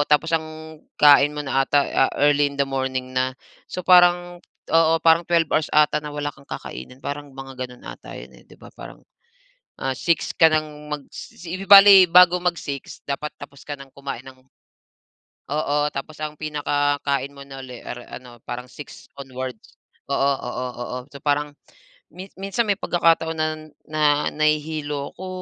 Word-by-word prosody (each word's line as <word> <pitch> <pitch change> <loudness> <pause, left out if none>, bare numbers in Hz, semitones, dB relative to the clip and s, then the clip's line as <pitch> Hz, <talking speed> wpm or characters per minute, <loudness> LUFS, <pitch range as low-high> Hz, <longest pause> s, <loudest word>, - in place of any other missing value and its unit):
tapos 150 +2 +2
ang 155 -1 -5 0.2
kain 145 0 +7
mo 150 - -3
na 135 0 0
'ata, 145 - +3 0.3
ah, - - -11
early 145 0 +4
in 140 - -11
the 140 - +4
morning 130 -1 -3
na. 130 0 0 0.3
So 180 - -5
parang, 175 -1 +4 0.3
oo, 165 0 +4
parang 165 +1 +5
12 170 -1 +3
hours 155 - +1
'ata 150 0 +3
na 150 - -7
wala 145 0 -3
kang 140 0 -20
kakainin, 125 - -8
parang 145 0 -6
mga 135 0 -8
gano'n 125 0 -16
'ata - - -10
'yon, - - -11
eh, - - -19
di - - -16
ba? - - -13
Parang, - - -12 0.8
ah, 135 0 -1
6:00 170 +4 0
ka 165 - +6
ng 150 -1 -3
magsi 165 +4 -8
bali 200 -1 +10
bago 180 +1 +7
mag-6:00 165 -6 -4
dapat 140 +2 -3
tapos 140 -1 -12
ka 145 - -5
ng 135 0 -12
kumain 135 -3 -6
ng 130 -1 -13 1.1
oo, 150 0 -1 0.2
tapos 140 +3 -6
ang 150 0 -4
pinaka 145 -1 -1
kain 140 0 -1
mo 140 - -11
na 135 -1 -10
ulit, 125 -2 -10
ar 120 - -7 0.2
around, 120 -1 -15
parang 125 +1 -6
6:00 150 - -12
onwards. 130 -3 -8 0.4
Oo, 140 - +1 0.3
oo, 125 +1 -4
oo. 120 +1 -5
So 140 - -9
parang, 145 0 0 0.8
minsan 195 +4 -1
may 200 - +3
pagkakataon 165 -3 +1
na, 155 0 +1 0.4
na 155 0 -3 0.3
nahihilo 150 -1 -1
ako. 185 +1 -8
145 Hz, 170 wpm, -22 LUFS, 135-160 Hz, 1.1 s, bali